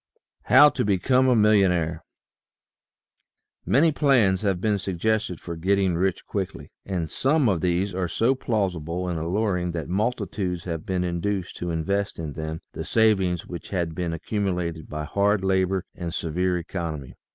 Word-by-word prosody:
HOW 145 Hz, +4 st, +8 dB
TO -, -, -2 dB
BECOME 125 Hz, +7 st, +2 dB
A 125 Hz, -, +4 dB
MILLIONAIRE 90 Hz, -7 st, +3 dB, 1.6 s
jjANY 155 Hz, +5 st, +4 dB
plans 120 Hz, -11 st, +3 dB
have 100 Hz, -4 st, 0 dB
been 105 Hz, +1 st, +1 dB
suggested 95 Hz, 0 st, -1 dB
for 85 Hz, -, -6 dB
getting 95 Hz, +2 st, +1 dB
rich 95 Hz, +2 st, -1 dB
quickly, 95 Hz, -3 st, -5 dB
and 85 Hz, -5 st, -3 dB
some 140 Hz, 0 st, +2 dB
of 95 Hz, -6 st, +1 dB
these 90 Hz, +2 st, 0 dB
are 90 Hz, -1 st, -1 dB
so 115 Hz, +9 st, +2 dB
plausible 90 Hz, -, -2 dB
and 85 Hz, -2 st, -2 dB
alluring 90 Hz, 0 st, -1 dB
that 80 Hz, -3 st, -4 dB
multitudes 95 Hz, -3 st, -2 dB
have 80 Hz, -3 st, -5 dB
been 90 Hz, -1 st, 0 dB
induced 90 Hz, +2 st, -2 dB
to 90 Hz, -, -4 dB
invest 100 Hz, +5 st, -1 dB
in 80 Hz, -3 st, -5 dB
them 80 Hz, +2 st, -5 dB
the -, -, -5 dB
savings 95 Hz, -6 st, +2 dB
which 85 Hz, -2 st, -8 dB
had 85 Hz, -4 st, -2 dB
been 85 Hz, 0 st, -2 dB
accu 90 Hz, +6 st, -3 dB
mulated 85 Hz, -4 st, -2 dB
by 75 Hz, 0 st, -4 dB
hard 100 Hz, +5 st, +1 dB
labor 95 Hz, -1 st, +1 dB
and 85 Hz, -2 st, -5 dB
severe 90 Hz, +2 st, 0 dB
economy. 80 Hz, -6 st, -5 dB
90 Hz, 155 wpm, -25 LUFS, 85-105 Hz, 1.6 s, HOW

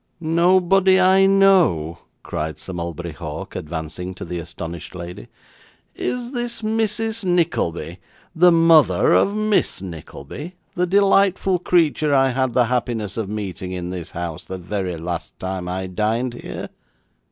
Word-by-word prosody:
'Nobody 185 Hz, +3 st, +4 dB
I 190 Hz, +1 st, +5 dB
know!' 180 Hz, -, +3 dB, 0.2 s
cried 80 Hz, 0 st, -4 dB
Sir 95 Hz, -, -8 dB
Mulberry 85 Hz, 0 st, -5 dB
Hawk, 75 Hz, -, -7 dB
advancing 80 Hz, +3 st, -5 dB
to -, -, -7 dB
the 90 Hz, -, -4 dB
astonished 85 Hz, +1 st, -7 dB
lady. 90 Hz, 0 st, -8 dB, 0.7 s
'Is 245 Hz, 0 st, -3 dB
this 240 Hz, -3 st, -4 dB
Mrs. 220 Hz, 0 st, -1 dB
Nickleby 95 Hz, -, 0 dB, 0.4 s
the 175 Hz, +2 st, +6 dB
mother 165 Hz, -2 st, +5 dB
of 200 Hz, -, +3 dB
Miss 215 Hz, -1 st, +1 dB
Nickleby 90 Hz, -, -8 dB, 0.2 s
the 180 Hz, 0 st, 0 dB
delightful 195 Hz, -1 st, +3 dB
creature 165 Hz, -4 st, +2 dB
that 140 Hz, -, +4 dB
I 135 Hz, 0 st, +4 dB
had 130 Hz, -1 st, 0 dB
the 125 Hz, -, +5 dB
happiness 115 Hz, -4 st, -2 dB
of 110 Hz, -4 st, -3 dB
meeting 95 Hz, -3 st, -5 dB
in 90 Hz, -1 st, -4 dB
this 90 Hz, -3 st, -6 dB
house 85 Hz, -2 st, -5 dB
the 95 Hz, -, -6 dB
very 90 Hz, -1 st, -3 dB
last 85 Hz, +1 st, -5 dB
time 95 Hz, -1 st, -4 dB
I 95 Hz, +1 st, -3 dB
dined 110 Hz, +6 st, -1 dB
here? 120 Hz, -, -7 dB
120 Hz, 140 wpm, -21 LUFS, -, 0.7 s, the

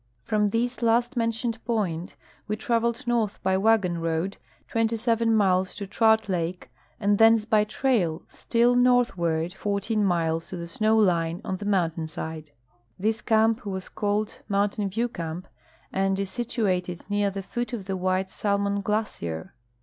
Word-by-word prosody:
From 210 Hz, -, +1 dB
this 240 Hz, +4 st, -1 dB
last 235 Hz, +3 st, +2 dB
mentioned 230 Hz, 0 st, -1 dB
point 190 Hz, -8 st, -2 dB, 0.3 s
we 215 Hz, -, -1 dB
traveled 235 Hz, +4 st, 0 dB
north 230 Hz, -4 st, 0 dB
by 190 Hz, 0 st, +2 dB
Avagon 190 Hz, -4 st, +2 dB
road 165 Hz, +4 st, -1 dB, 0.3 s
27 230 Hz, 0 st, +1 dB
miles 190 Hz, -4 st, +2 dB
to 200 Hz, -, -5 dB
Trout 220 Hz, +2 st, +3 dB
lake, 175 Hz, -1 st, -3 dB, 0.3 s
and 205 Hz, 0 st, +2 dB
thence 225 Hz, -1 st, +6 dB
by 215 Hz, -1 st, +3 dB
trail, 210 Hz, -8 st, 0 dB
still 240 Hz, +1 st, +1 dB
northward, 185 Hz, -10 st, +2 dB
14 205 Hz, +2 st, -1 dB
miles 165 Hz, -3 st, 0 dB
to 185 Hz, -, -5 dB
the 170 Hz, 0 st, -6 dB
snow 215 Hz, +6 st, +2 dB
line 170 Hz, -5 st, +2 dB
on 190 Hz, -, -2 dB
the 205 Hz, -, -7 dB
mountain 170 Hz, -5 st, 0 dB
side. 160 Hz, -1 st, -6 dB, 0.5 s
This 215 Hz, +2 st, 0 dB
camp 220 Hz, 0 st, +2 dB
was 190 Hz, -2 st, -5 dB
called 210 Hz, 0 st, -2 dB
Mountain 200 Hz, 0 st, 0 dB
VieAV 230 Hz, +5 st, -2 dB
camp, 165 Hz, +2 st, -5 dB, 0.5 s
and 195 Hz, 0 st, +1 dB
is 195 Hz, -1 st, -2 dB
situated 195 Hz, -7 st, -2 dB
near 205 Hz, 0 st, +1 dB
the 195 Hz, 0 st, -5 dB
foot 240 Hz, +6 st, -4 dB
of 220 Hz, -6 st, -5 dB
the 195 Hz, 0 st, -2 dB
Mdiite 185 Hz, +1 st, 0 dB
Salmon 200 Hz, 0 st, 0 dB
glacier. 200 Hz, -, -3 dB
205 Hz, 150 wpm, -26 LUFS, 185-225 Hz, 0.5 s, thence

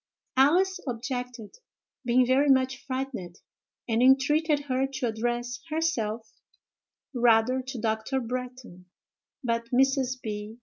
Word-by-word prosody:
Alice 365 Hz, +8 st, +3 dB
objected, 245 Hz, -2 st, -5 dB, 0.5 s
being 250 Hz, 0 st, +3 dB
very 270 Hz, +3 st, +3 dB
much 260 Hz, 0 st, +2 dB
frightened, 255 Hz, -10 st, -4 dB, 0.5 s
and 230 Hz, 0 st, +1 dB
entreated 290 Hz, +4 st, +3 dB
her 265 Hz, -1 st, -1 dB
to 270 Hz, -2 st, -4 dB
address 240 Hz, +2 st, -2 dB
herself 235 Hz, -9 st, -2 dB, 0.8 s
rather 240 Hz, +1 st, +3 dB
to 260 Hz, -1 st, -7 dB
Dr. 220 Hz, +4 st, -1 dB
Bretton; 250 Hz, -6 st, -6 dB, 0.6 s
but 230 Hz, -1 st, -1 dB
Mrs. 260 Hz, 0 st, +2 dB
B. 215 Hz, 0 st, -6 dB
250 Hz, 105 wpm, -27 LUFS, 230-265 Hz, 0.8 s, Alice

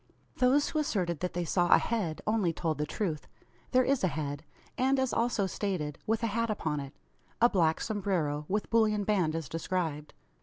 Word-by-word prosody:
Those 265 Hz, +3 st, +3 dB
who 310 Hz, -, -1 dB
asserted 180 Hz, -, -1 dB
that 180 Hz, -, -3 dB
they 175 Hz, 0 st, -2 dB
saw 175 Hz, +1 st, +1 dB
a -, -, +9 dB
head, 200 Hz, -9 st, -2 dB
only 210 Hz, -5 st, +2 dB
told 160 Hz, -2 st, -2 dB
the 150 Hz, -, -1 dB
truth. 165 Hz, -6 st, -3 dB, 0.4 s
There 255 Hz, 0 st, +4 dB
is 275 Hz, -2 st, +1 dB
a -, -, +4 dB
head; 145 Hz, -2 st, -4 dB, 0.3 s
and, 265 Hz, +2 st, +2 dB
as 265 Hz, -1 st, 0 dB
also 230 Hz, -3 st, +1 dB
stated, 180 Hz, -6 st, -3 dB
with 225 Hz, +1 st, 0 dB
a 225 Hz, -3 st, 0 dB
hat 230 Hz, 0 st, 0 dB
upon 155 Hz, -8 st, -1 dB
it 140 Hz, 0 st, -8 dB, 0.4 s
a 240 Hz, -, +7 dB
black 165 Hz, -6 st, +2 dB
sombrero, 180 Hz, -9 st, -1 dB
with 210 Hz, +2 st, -1 dB
bullion 215 Hz, -2 st, +3 dB
band 185 Hz, -6 st, +1 dB
as 165 Hz, -4 st, -3 dB
described. 165 Hz, -2 st, -3 dB
185 Hz, 190 wpm, -30 LUFS, 160-225 Hz, 0.4 s, a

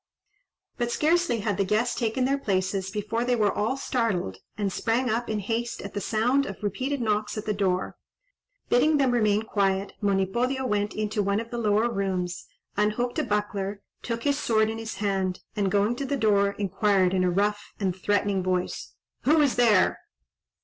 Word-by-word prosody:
But 240 Hz, 0 st, 0 dB
scarcely 315 Hz, -5 st, +2 dB
had 205 Hz, -3 st, -1 dB
the 200 Hz, -, +2 dB
guests 215 Hz, +5 st, +1 dB
taken 240 Hz, +2 st, 0 dB
their 275 Hz, +2 st, +1 dB
places, 190 Hz, -3 st, -1 dB
before 215 Hz, +3 st, -2 dB
they 245 Hz, 0 st, +2 dB
were 210 Hz, -3 st, +2 dB
all 225 Hz, +6 st, -1 dB
startled, 220 Hz, -, -1 dB, 0.2 s
and 200 Hz, -3 st, -1 dB
sprang 235 Hz, +2 st, 0 dB
up 235 Hz, +2 st, -1 dB
in 215 Hz, -, 0 dB
haste 230 Hz, +4 st, -2 dB
at 200 Hz, -, -7 dB
the, 205 Hz, -, -3 dB
sound 245 Hz, +7 st, +1 dB
of 195 Hz, +1 st, -8 dB
repeated 260 Hz, +7 st, -2 dB
knocks 215 Hz, -1 st, -1 dB
at 215 Hz, -, -4 dB
the 210 Hz, -, 0 dB
door. 190 Hz, -2 st, -1 dB, 0.7 s
Bidding 295 Hz, +5 st, +4 dB
them 270 Hz, -3 st, +3 dB
remain 215 Hz, -3 st, +2 dB
quiet, 195 Hz, -2 st, 0 dB
Monipodio 235 Hz, +7 st, 0 dB
went 210 Hz, -3 st, -1 dB
into 215 Hz, 0 st, -1 dB
one 200 Hz, +1 st, +1 dB
of 230 Hz, 0 st, -7 dB
the 240 Hz, -, -3 dB
lower 215 Hz, +1 st, +2 dB
rooms, 185 Hz, -5 st, -2 dB, 0.3 s
unhooked 215 Hz, +4 st, 0 dB
a -, -, +1 dB
buckler, 205 Hz, -1 st, -2 dB, 0.2 s
took 230 Hz, 0 st, -4 dB
his 285 Hz, 0 st, +1 dB
sword 220 Hz, -4 st, +2 dB
in 225 Hz, -, -5 dB
his 225 Hz, -1 st, -5 dB
hand, 190 Hz, -2 st, -1 dB
and, 200 Hz, -2 st, +1 dB
going 205 Hz, +4 st, +2 dB
to 280 Hz, -, -3 dB
the 280 Hz, +1 st, -1 dB
door, 200 Hz, -3 st, +3 dB
inquired, 195 Hz, -2 st, +1 dB
in 185 Hz, -1 st, +2 dB
a 180 Hz, -, +3 dB
rough 205 Hz, +3 st, -1 dB
and 190 Hz, -3 st, 0 dB
threatening 200 Hz, 0 st, +1 dB
voice, 180 Hz, 0 st, -2 dB, 0.3 s
"Who 310 Hz, +4 st, +5 dB
is 285 Hz, -4 st, +3 dB
there?" 225 Hz, -6 st, +4 dB
210 Hz, 185 wpm, -26 LUFS, 200-240 Hz, 0.7 s, Who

